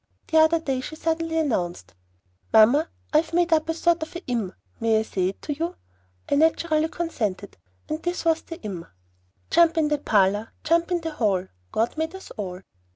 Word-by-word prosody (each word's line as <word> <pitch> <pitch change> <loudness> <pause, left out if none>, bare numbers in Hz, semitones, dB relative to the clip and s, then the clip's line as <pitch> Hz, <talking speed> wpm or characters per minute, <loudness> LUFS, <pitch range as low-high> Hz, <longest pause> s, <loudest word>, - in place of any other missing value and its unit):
The 320 - +5
other 315 +1 +5
day 270 -5 -2
she 310 - -7
suddenly 325 0 -1
announced, 175 - -1 0.6
"Mamma, 250 +9 +6 0.2
I - - +6
have 320 +2 0
made 345 -1 +3
up 315 0 +2
a 325 - 0
sort 340 0 +2
of 315 - -6
a 345 - -7
im. 230 -7 -1 0.3
May 225 -1 +3
I - - 0
say 185 -4 -1
it 195 - -10
to 295 - -2
you?" 335 +5 -3 0.5
I - - -1
naturally 315 +1 +3
consented, 220 - -3 0.3
and 310 +1 -3
this 350 -1 -3
was 325 -1 +3
the 330 - -9
IM. 180 -5 -5 0.6
Jump 335 -1 +5
in 310 -2 +3
the 295 -1 +1
parlor, 205 +1 +2
Jump 335 +2 +2
in 350 -1 0
the 325 0 -3
hall, 195 -9 0 0.2
God 230 +7 0
made 320 +3 -2
us 380 - -10
all! 190 -5 -6
310 Hz, 195 wpm, -25 LUFS, 220-330 Hz, 0.6 s, Mamma